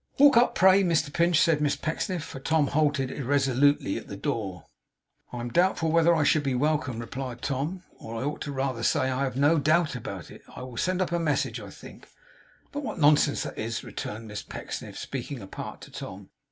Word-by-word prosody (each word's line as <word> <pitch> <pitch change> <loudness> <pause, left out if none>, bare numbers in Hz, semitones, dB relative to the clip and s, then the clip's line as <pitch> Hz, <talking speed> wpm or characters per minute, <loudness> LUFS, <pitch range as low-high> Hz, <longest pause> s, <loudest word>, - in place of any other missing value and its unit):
'Walk 285 0 +7
up, 240 +1 +4
pray, 190 +1 +6
Mr 155 -5 +1
Pinch,' 170 -1 +3
said 160 -4 +3
Miss 145 -1 +2
Pecksniff. 165 +1 -3
For 135 - -8
Tom 160 +2 +2
halted, 145 -3 +1
irresolutely, 140 -3 +2
at - - -13
the 100 - -7
door. 100 - -3 0.7
'I 125 - -5
am 120 - -4
doubtful 170 +2 +2
whether 165 +1 +5
I 155 - +2
should 150 +1 +3
be 135 -3 -1
welcome,' 145 -2 0
replied 120 +2 -6
Tom, 150 +7 -2 0.2
'or, 115 - -7
I 115 - -3
ought 150 +1 -3
rather 135 -3 -2
to - - -5
say, 130 +3 +2
I 130 +1 -1
have 130 -1 -4
no 145 +3 +4
doubt 155 +1 +2
about 100 -7 -7
it. - - -12
I - - -7
will 125 -2 -9
send 185 +7 +1
up 175 - -5
a 170 - +1
message, 150 -4 0
I - - -9
think.' - - -13 0.6
'But 290 - -4
what 225 -9 -5
nonsense 145 -2 +4
that - - -7
is!' 115 +1 -3
returned 110 +2 -6
Miss 105 -1 -5
Pecksniff, - - -7
speaking 140 - -5
apart 95 -3 -8
to - - -12
Tom. - - -8
145 Hz, 205 wpm, -27 LUFS, 130-165 Hz, 0.7 s, Walk